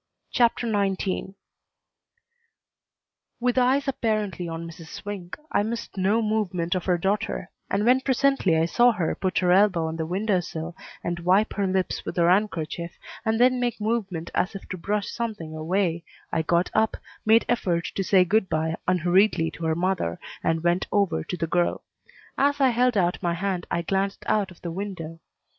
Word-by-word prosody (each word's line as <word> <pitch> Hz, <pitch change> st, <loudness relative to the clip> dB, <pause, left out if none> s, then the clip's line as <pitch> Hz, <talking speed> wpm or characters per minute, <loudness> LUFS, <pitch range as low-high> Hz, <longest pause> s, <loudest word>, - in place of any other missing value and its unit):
CHAPTER 240 Hz, 0 st, +2 dB
XIX 195 Hz, -2 st, -1 dB, 2.0 s
With 245 Hz, +1 st, +2 dB
eyes 265 Hz, +3 st, +2 dB
apparently 215 Hz, -8 st, -1 dB
on 165 Hz, +1 st, -5 dB
Mrs. 165 Hz, -1 st, -11 dB
Swink, 190 Hz, -1 st, -7 dB
I -, -, +3 dB
missed 225 Hz, +1 st, -4 dB
no 200 Hz, +4 st, +2 dB
movement 190 Hz, -6 st, 0 dB
of 185 Hz, -2 st, -2 dB
her 180 Hz, -2 st, +2 dB
daughter, 195 Hz, 0 st, -1 dB, 0.2 s
and 200 Hz, +2 st, 0 dB
when 255 Hz, +2 st, +5 dB
presently 265 Hz, -9 st, +2 dB
I 160 Hz, -, +3 dB
saw 240 Hz, +8 st, +4 dB
her 175 Hz, -7 st, -1 dB
put 185 Hz, -1 st, -2 dB
her 180 Hz, -1 st, +3 dB
elbow 185 Hz, -3 st, +4 dB
on 160 Hz, 0 st, -3 dB
the 160 Hz, -1 st, -2 dB
window 190 Hz, +2 st, +1 dB
sill 165 Hz, -1 st, -6 dB, 0.3 s
and 175 Hz, 0 st, -2 dB
wipe 185 Hz, +5 st, +3 dB
her 200 Hz, -2 st, 0 dB
lips 185 Hz, 0 st, -1 dB
with -, -, -6 dB
her 170 Hz, 0 st, +4 dB
handkerchief, 170 Hz, -4 st, -1 dB, 0.3 s
and 220 Hz, -1 st, +1 dB
then 250 Hz, +1 st, +4 dB
make 245 Hz, -2 st, -1 dB
movement 205 Hz, -7 st, -2 dB
as 185 Hz, -, 0 dB
if 195 Hz, -, -8 dB
to -, -, -3 dB
brush 205 Hz, +3 st, -1 dB
something 210 Hz, -10 st, -4 dB
away, 170 Hz, +1 st, 0 dB, 0.3 s
I 165 Hz, -, +1 dB
got 170 Hz, +2 st, +1 dB
up, 220 Hz, 0 st, +2 dB, 0.3 s
made 220 Hz, +1 st, +5 dB
effort 180 Hz, -8 st, 0 dB
to 195 Hz, -, -1 dB
say 185 Hz, -1 st, +4 dB
good 205 Hz, +1 st, +2 dB
by 160 Hz, +1 st, 0 dB
unhurriedly 180 Hz, -1 st, +3 dB
to 165 Hz, -, -6 dB
her 160 Hz, 0 st, +1 dB
mother, 175 Hz, -, -1 dB, 0.2 s
and 165 Hz, 0 st, 0 dB
went 175 Hz, +2 st, +1 dB
over 195 Hz, -6 st, +1 dB
to 180 Hz, -, -5 dB
the 165 Hz, -, -1 dB
girl. 175 Hz, +1 st, 0 dB, 0.6 s
As 285 Hz, +1 st, +2 dB
I 270 Hz, -2 st, +5 dB
held 245 Hz, -1 st, +2 dB
out 175 Hz, -2 st, +1 dB
my 170 Hz, -1 st, 0 dB
hand 185 Hz, -1 st, -2 dB
I 170 Hz, -, -1 dB
glanced 195 Hz, +2 st, -1 dB
out 205 Hz, -3 st, +1 dB
of 180 Hz, -, -17 dB
the 170 Hz, -, -3 dB
window. 170 Hz, -3 st, -6 dB
190 Hz, 180 wpm, -25 LUFS, 170-215 Hz, 2.0 s, when